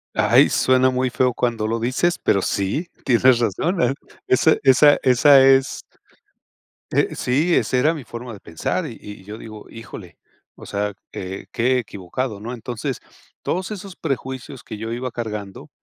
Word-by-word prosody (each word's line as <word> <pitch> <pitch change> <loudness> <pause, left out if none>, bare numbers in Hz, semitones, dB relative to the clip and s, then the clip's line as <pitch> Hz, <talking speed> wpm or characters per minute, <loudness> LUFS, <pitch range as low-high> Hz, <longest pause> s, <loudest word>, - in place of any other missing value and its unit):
¡Ay! - - +5
Suena 130 0 +3
muy 130 0 0
feo 125 0 +1
cuando 115 -3 -1
lo 115 +1 -1
dices, 130 +9 0
pero 100 - +2
sí, 100 - -2 0.2
tienes 125 0 +4
razón, 125 - 0
¿eh? 125 +2 +2 0.3
Esa 155 +5 +4
esa 140 +2 +6
esa 135 +2 +6
es 135 0 +3 1.1
eh, - - +1
sí, 150 +8 +1
esa 130 - +1
era 155 +6 +3
mi 150 -5 -7
forma 120 +1 -8
de 100 - -12
pensar 80 -1 -3
y - - -8
y 105 -2 -11
yo 105 +2 -9
digo: 110 -2 -10
"Híjole". 110 -5 -11 0.4
O - - -13
sea, 105 0 -2 0.2
eh, 95 +1 -6
qué 125 +2 +2
equivocado, 105 +1 -5
¿no? 120 +3 -5
Entonces, 120 -1 -5 0.4
todos 185 +4 -2
esos 195 -2 -7
prejuicios 130 -2 -5
que 110 - -8
yo 110 +2 -5
iba 125 +2 -3
cargando, 105 -4 -6
125 Hz, 165 wpm, -21 LUFS, 110-135 Hz, 1.1 s, esa